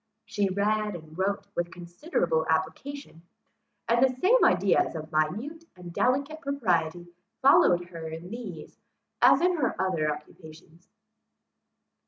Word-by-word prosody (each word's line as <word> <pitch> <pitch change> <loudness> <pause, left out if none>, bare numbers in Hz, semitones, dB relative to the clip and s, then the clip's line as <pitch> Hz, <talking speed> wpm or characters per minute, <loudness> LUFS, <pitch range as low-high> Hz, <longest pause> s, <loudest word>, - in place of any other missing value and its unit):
She 205 -2 -1
read 210 +1 0
and 155 -2 -11
wrote 195 +3 -1
with 175 0 -2
considerable 170 - -2
application; 190 - -3 0.7
and 235 +2 +3
the 265 - +5
same 465 - +4
ideas 360 - +3
of 155 0 -7
minute 220 - -2
and 175 -1 -10
delicate 280 - 0
propriety 175 - -1 0.3
followed 175 -10 +5
her 165 -2 -7
in 165 +4 -8
these, 215 -9 -8 0.4
as - - +6
in 360 0 +2
her 265 -6 -1
other 160 -5 0
occupations. 160 +2 -12
185 Hz, 125 wpm, -27 LUFS, 165-260 Hz, 0.7 s, as